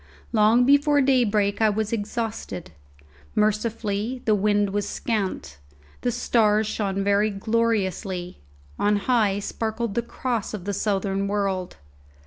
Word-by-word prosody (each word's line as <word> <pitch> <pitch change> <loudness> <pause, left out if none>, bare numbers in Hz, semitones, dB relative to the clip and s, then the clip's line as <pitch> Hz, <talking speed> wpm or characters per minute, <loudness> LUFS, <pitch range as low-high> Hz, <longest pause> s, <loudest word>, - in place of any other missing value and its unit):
Long 225 +2 +4
before 285 +2 +4
daybreak 220 -7 +2
I 220 - +5
was 215 +1 -1
exhausted. 215 - -4 0.6
Mercifully, 215 +2 -1
the 220 - +3
wind 205 0 +2
was 205 0 -2
scant; 190 - -3 0.4
the 245 - 0
stars 220 -2 +2
shone 200 -2 -2
very 200 +2 +3
gloriously; 195 -4 -1 0.4
on 210 0 +3
high 205 -2 +2
sparkled 220 +1 -3
the 235 - 0
Cross 235 -2 -3
of 190 -3 -8
the 200 - -2
southern 195 -1 -1
world. 195 -3 -2
210 Hz, 120 wpm, -24 LUFS, 200-230 Hz, 0.6 s, I